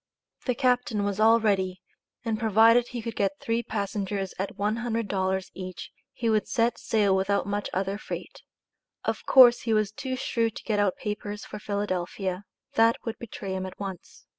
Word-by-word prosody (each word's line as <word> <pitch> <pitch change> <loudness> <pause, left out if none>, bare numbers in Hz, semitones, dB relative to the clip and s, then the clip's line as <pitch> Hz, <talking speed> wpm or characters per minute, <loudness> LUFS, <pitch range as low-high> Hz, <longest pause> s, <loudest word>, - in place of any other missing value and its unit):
The 250 - +2
captain 250 -4 +1
was 200 0 -2
all 225 +2 +6
ready, 190 -4 +1 0.5
and 220 -2 -1
provided 225 +2 +5
he 240 -3 -6
could 230 0 -5
get 195 -1 0
three 230 +1 0
passengers 200 -3 -3
at 195 - -3
$100 205 -3 -1
each 185 -1 -7 0.2
he 235 - -3
would 215 -2 +2
set 235 -1 +1
sail 205 -3 +2
without 195 +1 +1
much 205 +1 -2
other 195 +2 -2
freight. - - -7 0.6
Of - - -2
course 245 -2 +8
he 225 - -1
was 215 -2 +1
too 260 +4 -4
shrewd 230 -3 -1
to - - -8
get 210 -2 0
out 200 -3 +2
papers 210 0 -5
for 210 - -8
Philadelphia. 195 -2 -3 0.3
That 230 +1 +5
would 225 - -4
betray 200 -4 -6
him 190 0 -3
at 185 - -11
once. 195 -3 -8
210 Hz, 170 wpm, -27 LUFS, 195-230 Hz, 0.6 s, course